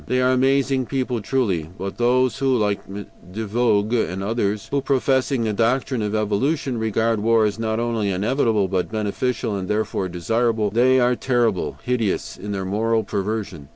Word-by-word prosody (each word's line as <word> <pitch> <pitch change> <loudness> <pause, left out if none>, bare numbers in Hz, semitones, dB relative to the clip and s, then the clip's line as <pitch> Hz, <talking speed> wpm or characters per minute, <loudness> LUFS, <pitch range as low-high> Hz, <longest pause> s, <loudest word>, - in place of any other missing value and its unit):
They 125 - +1
are 130 0 +3
amazing 135 0 +2
people 130 -3 -2
truly, 100 - -1
but 95 +3 -6
those 125 +2 +2
who, 135 -2 +2
like 105 -2 -1
De 100 +1 -8
Vogüé 110 0 +1
and 95 +2 -4
others, 105 -1 -1
who, 140 0 +1
professing 135 -1 +1
the 110 -1 0
doctrine 120 +3 0
of 105 0 -1
evolution, 120 +5 0
regard 110 0 0
war 115 +1 +3
as 105 +1 -2
not 110 0 -1
only 115 -3 -1
inevitable, 105 +1 +1
but 95 -1 -2
beneficial 110 +1 -2
and 95 -2 -4
therefore 105 -3 -1
desirable 110 +4 0
they 130 +4 +4
are 125 0 +3
terrible, 120 -7 0
hideous, 120 -5 -1
in 105 - -7
their 95 -1 -3
moral 110 +3 0
perversion. 100 -7 -4
110 Hz, 165 wpm, -22 LUFS, 100-125 Hz, -, they